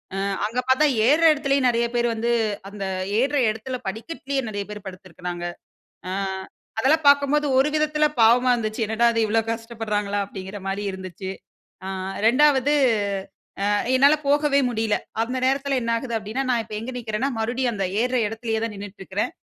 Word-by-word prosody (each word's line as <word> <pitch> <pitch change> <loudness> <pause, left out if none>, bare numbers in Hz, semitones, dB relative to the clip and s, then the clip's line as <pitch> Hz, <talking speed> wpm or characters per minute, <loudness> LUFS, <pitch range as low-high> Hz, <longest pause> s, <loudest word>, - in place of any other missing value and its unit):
அ - - -3 0.3
அங்க 230 +4 -2
பாத்தா 265 +4 +5 0.2
ஏறுற 310 +4 +4
இடத்துலேயும் 275 -3 +1
நெறைய 235 0 +1
பேர் 240 0 +2
வந்து 230 +1 -1 0.4
அந்த 200 -1 -6 0.3
ஏறுற 280 +3 +1
இடத்துல 225 +4 -4
படிக்கட்டிலேயே 270 +5 -3
நெறைய 205 -1 -3
பேர் 210 -1 -8
படுத்துருக்காங்க. 180 -1 -7 0.6
அ - - -3 0.7
அதெல்லாம் 295 +6 +3
பாக்கும்போது 285 +1 +4
ஒரு 275 +3 +4
விதத்துல 305 0 +1 0.2
பாவமா 245 +3 +5
இருந்துச்சு. 220 -1 -2
என்னடா! 220 +2 +2
இது 230 - 0
இவள 225 +2 +2
கஷ்டப்படுறாங்களா, 225 -3 -2
அப்டீங்கிறமாரி 195 0 -5
இருந்துச்சு. 190 0 -7 0.6
அ - - -4 0.4
ரெண்டாவது 285 +3 +4 0.9
அ - - +1 0.3
என்னால 280 +3 +6
போகவே 290 0 +3
முடியல. 220 -2 0 0.3
அந்த 250 +3 -3
நேரத்துல 275 0 +1
என்ன 230 - -2
ஆகுது 235 0 -4
அப்பிடீன்னா, 220 +6 -3
நான் 235 -2 +2
இப்ப 215 -1 -9
எங்க 235 - -5
நிற்கிறன்னா, 225 +3 -2
மறுபடியும் 240 +2 0
அந்த 195 -1 -2 0.2
ஏறுற 250 0 +1
இடத்துலேயே 225 0 -3
தான் 230 - -3
நின்னுட்டு 200 0 -9
இருக்குறேன். 190 +2 -2
230 Hz, 155 wpm, -23 LUFS, 210-270 Hz, 0.9 s, என்னால